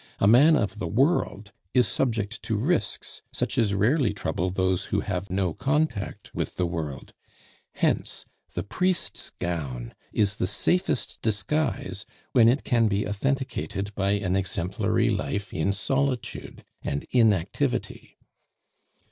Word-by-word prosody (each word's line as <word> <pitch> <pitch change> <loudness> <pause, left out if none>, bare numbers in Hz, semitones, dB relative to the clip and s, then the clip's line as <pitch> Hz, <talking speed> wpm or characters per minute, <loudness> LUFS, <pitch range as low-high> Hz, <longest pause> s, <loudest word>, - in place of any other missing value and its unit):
A - - +2
man 135 +10 +7
of 105 -6 -1
the 95 - -2
world 115 - +1 0.2
is 125 -1 +5
subject 110 -3 -1
to 110 - -1
risks 155 - -1
such - - -2
as 105 -4 +2
rarely 115 +3 +3
trouble 90 -2 -1
those 95 0 +1
who - - 0
have 90 +2 -3
no 95 -2 0
contact 135 - -1
with - - -3
the 90 - +1
world; 80 -5 -4 0.6
hence - - 0 0.3
the 90 - -1
priest's 180 - -1
gown 70 -9 -3 0.2
is 105 -1 +1
the 90 - 0
safest 180 - 0
disguise 110 -1 -1 0.2
when 115 -3 +6
it 135 +4 +2
can 115 -3 +3
be 105 0 0
authenticated 105 -3 -2
by 100 0 +1
an 95 -3 0
exemplary 95 +2 +1
life 100 -1 -2
in 80 +5 +1
solitude 130 +5 -2 0.2
and 70 - -3
inactivity. 110 -8 +1
105 Hz, 130 wpm, -26 LUFS, 95-125 Hz, 0.6 s, man